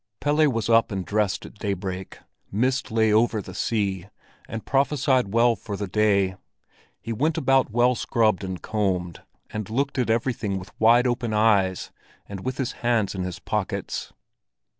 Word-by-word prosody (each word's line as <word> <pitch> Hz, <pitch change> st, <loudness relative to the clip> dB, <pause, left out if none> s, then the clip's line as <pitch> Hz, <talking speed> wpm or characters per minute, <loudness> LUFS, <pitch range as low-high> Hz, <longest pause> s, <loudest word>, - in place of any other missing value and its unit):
Pelle 150 Hz, +1 st, +3 dB
was 115 Hz, -2 st, -2 dB
up 115 Hz, 0 st, +4 dB
and 95 Hz, -2 st, -3 dB
dressed 105 Hz, +1 st, 0 dB
at 105 Hz, -, -13 dB
daybreak. 95 Hz, -2 st, -4 dB, 0.3 s
Mist 125 Hz, +6 st, 0 dB
lay 110 Hz, -1 st, +3 dB
over 110 Hz, 0 st, +3 dB
the 100 Hz, -, -8 dB
sea, 100 Hz, -5 st, -1 dB, 0.4 s
and 115 Hz, -1 st, -6 dB
prophesied 135 Hz, -4 st, +1 dB
well 115 Hz, +1 st, +4 dB
for 100 Hz, 0 st, -6 dB
the 100 Hz, -, -3 dB
day. 100 Hz, -2 st, +2 dB, 0.6 s
He 115 Hz, -, -5 dB
went 155 Hz, +8 st, 0 dB
about 135 Hz, -1 st, +3 dB
well 120 Hz, +3 st, +3 dB
scrubbed 110 Hz, -5 st, +1 dB
and 95 Hz, -1 st, -4 dB
combed, 95 Hz, -6 st, -2 dB, 0.3 s
and 105 Hz, -2 st, -5 dB
looked 135 Hz, +4 st, -1 dB
at 125 Hz, -, 0 dB
everything 110 Hz, -4 st, 0 dB
with 95 Hz, -, -9 dB
wide 120 Hz, +3 st, +5 dB
open 120 Hz, -3 st, -1 dB
eyes, 100 Hz, -4 st, +2 dB, 0.3 s
and 100 Hz, -1 st, -7 dB
with 130 Hz, 0 st, -3 dB
his 130 Hz, -1 st, -1 dB
hands 115 Hz, -4 st, +1 dB
in 95 Hz, -, -4 dB
his 90 Hz, -1 st, -4 dB
pockets. -, -, -3 dB
110 Hz, 160 wpm, -24 LUFS, 100-120 Hz, 0.6 s, wide